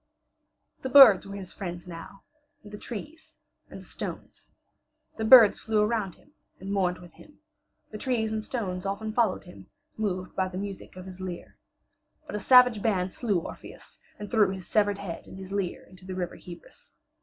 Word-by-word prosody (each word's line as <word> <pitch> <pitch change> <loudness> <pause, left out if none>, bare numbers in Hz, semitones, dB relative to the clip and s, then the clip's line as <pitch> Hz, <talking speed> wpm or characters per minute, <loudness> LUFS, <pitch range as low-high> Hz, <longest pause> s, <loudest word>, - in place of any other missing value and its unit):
The 260 - -4
birds 245 -8 +8
were 200 - -7
his 190 -3 -8
friends 175 -2 -7
now, 175 +3 -10 0.4
and 205 - -13
the 210 - -7
trees 305 +8 -9 0.3
and - - -10
the - - -14
stones. - - -8 0.7
The 220 - -3
birds 220 -2 +8
flew 220 -1 0
around 210 -4 -1
him 290 - -25 0.3
and 195 +2 -5
mourned 180 -2 +1
with 175 -2 -14
him; 300 - -18 0.5
the 215 - -7
trees 225 -3 -1
and 220 0 -2
stones 190 -7 -4
often 200 +2 -4
followed 225 -5 +1
him, 180 - -14 0.3
moved 185 -4 -3
by 190 -1 0
the 185 0 -7
music 195 -1 -7
of 185 0 -9
his 185 0 -10
lyre. 180 -2 -7 0.7
But 300 - -9
a - - -2
savage 250 -1 +6
band 190 -4 0
slew 215 -6 0
Orpheus - - -11 0.2
and 205 -1 -8
threw 215 -4 +4
his 190 -2 -6
severed 205 -2 +1
head 195 -5 -7
and - - -11
his 190 0 -9
lyre 195 -3 -3
into 185 0 -17
the 185 - -5
River 180 -2 -4
Hebrus. 170 -2 -14
200 Hz, 185 wpm, -27 LUFS, 185-220 Hz, 0.7 s, birds